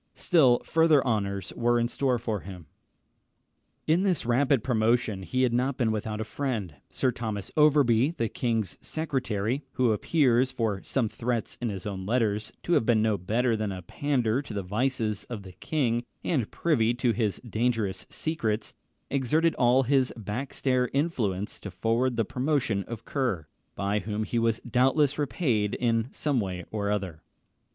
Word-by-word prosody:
Still 135 -8 +4
further 160 -4 +4
honours 100 -5 -1
were 120 0 +2
in 120 - +1
store 125 0 0
for 110 -3 -2
him. 90 -4 -10 1.2
In 160 +3 +3
this 185 -9 +1
rapid 130 0 +2
promotion 115 -4 +1
he 130 +7 0
had 125 -2 +2
not 125 +2 0
been 115 -4 +1
without 110 0 -3
a - - -1
friend. 110 - -3 0.2
Sir 130 - 0
Thomas 110 -5 -5
Overbury, 145 -2 +4
the 115 - 0
king's 115 -5 -2
secretary 130 -6 -2
who 125 -3 +2
appears, 130 +2 +2
from 110 -6 -2
some 130 -5 0
threats 120 +1 -2
in 120 - -1
his 95 -3 -5
own 95 -2 -4
letters, 110 -2 0
to 175 - 0
have - - +4
been 110 -2 +3
no 110 -1 +2
better 115 +6 0
than 105 -2 -2
a 90 -1 -6
pander 125 +2 0
to 120 -7 -8
the 100 - -2
vices 110 +1 -1
of 110 -5 -7
the 95 - -10
king, 120 - -1 0.2
and 130 -11 0
privy 120 -8 +1
to 125 -1 +1
his 110 -5 -1
dangerous 110 -4 -1
secrets 115 -9 -2 0.4
exerted 155 +5 +2
all 125 +2 +4
his 130 0 +2
backstair 125 +3 -1
influence 115 - -1
to 100 - -7
forward 115 +6 0
the 115 - +2
promotion 130 -6 0
of 115 -1 -7
Kerr, 120 - -1 0.3
by 100 +1 0
whom 105 +2 -3
he 115 +2 -1
was 115 -1 +1
doubtless 135 +4 +2
repaid 115 - 0
in 115 -1 +1
some 145 -4 0
way 90 -4 -3
or 105 -2 -1
other. 95 -6 -2
115 Hz, 165 wpm, -27 LUFS, 105-130 Hz, 1.2 s, Still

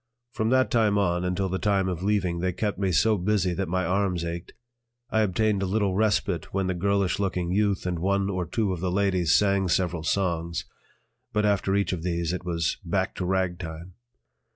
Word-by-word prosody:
From 110 -1 -1
that 130 +1 +3
time 110 -3 +3
on 90 -3 +1
until 90 +1 0
the 95 +1 -2
time 100 -2 +1
of 90 -2 -3
leaving 95 -4 0
they 90 +1 -1
kept 105 0 -2
me 95 -2 +1
so 105 +4 +3
busy 95 -1 +1
that 95 0 -2
my 95 +1 0
arms 90 -1 0
ached. 85 +1 -6 0.6
I 110 - +3
obtained 105 0 +1
a 95 - 0
little 100 0 +1
respite 100 -4 0
when 95 0 0
the 95 - 0
girlish 100 +1 0
looking 90 -3 -1
youth 100 -1 +1
and 90 -2 -1
one 100 +2 +1
or 90 -3 -2
two 105 +1 0
of 90 - -5
the 90 +1 -1
ladies 95 -3 +2
sang 100 -2 +3
several 90 -1 0
songs, 85 -1 -1 0.7
but 105 0 +1
after 100 -1 +1
each 100 -1 +1
of 85 - -4
these 85 -1 -1
it 90 - -4
was 85 -3 -1
"back - - -1
to 90 - -2
ragtime." 90 -2 -2
95 Hz, 200 wpm, -26 LUFS, 90-100 Hz, 0.7 s, that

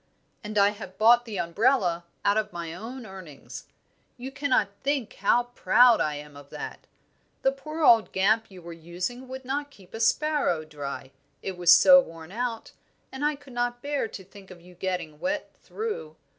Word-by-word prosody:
"And 210 0 -5
I 200 0 +6
have 200 -3 -9
bought 235 +3 +5
the 220 -4 -6
umbrella 175 -1 +1 0.2
out 200 - +4
of 215 -1 -1
my 170 -1 -6
own 230 +7 -8
earnings. 185 -8 -10 0.5
You 255 +2 -7
cannot 270 -7 +1
think 275 -4 -1
how 245 - +3
proud 245 -1 +5
I 150 -1 0
am 145 0 -10
of 140 0 -13
that! - - -8 0.6
The 270 - +4
poor 305 +4 -6
old 230 -5 +6
Gamp 215 +4 +2
you 185 -3 -13
were 170 0 -8
using 180 +10 -5
would 260 0 -8
not 285 +2 -2
keep 200 -10 -19
a 225 - -6
sparrow 270 - +1
dry, 140 -3 -7 0.3
it 190 - -4
was 175 -1 +4
so 275 +9 +9
worn 165 -4 -11
out, 230 +1 -4 0.4
and 265 +2 -6
I 300 0 +2
could 275 -2 -15
not 245 0 -2
bear 285 -4 -1
to 200 -3 -9
think 195 +1 -15
of 185 -2 -12
you 180 +1 -16
getting 180 -4 -4
wet 295 +2 -2
through. 425 - -5
215 Hz, 185 wpm, -26 LUFS, 175-260 Hz, 0.6 s, so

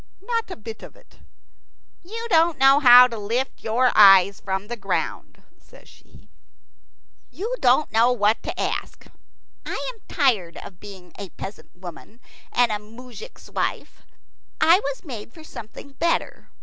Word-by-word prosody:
Not 460 0 -2
a - - -6
bit 220 0 -10
of - - -12
it. - - -23 0.8
"You 455 +6 -7
don't 330 -1 +3
know 270 +1 +5
how 250 -3 +9
to 230 -3 -7
lift 235 +6 -3
your 240 +3 +2
eyes 195 -1 +6
from 195 +1 -4
the 240 - -5
ground," 230 - -4 0.2
says - - -19
she. - - -20 1.0
"You 445 +6 -5
don't 255 +4 +2
know 230 +3 +3
what 215 -2 +1
to - - -6
ask. - - -4 0.6
I - - -5 0.2
am 450 - -24
tired 225 - 0
of 180 - -11
being 190 -3 -13
a 200 -2 -7
peasant 195 +5 -10
woman 180 +5 -12 0.3
and 245 -2 +2
a 210 - -2
moujik's 245 - -13
wife. - - -4 0.6
I 340 +3 +5
was 280 0 -6
made 230 -6 -8
for 320 +4 -15
something 280 -1 -11
better. 335 +5 -2
240 Hz, 150 wpm, -22 LUFS, 210-290 Hz, 1.0 s, how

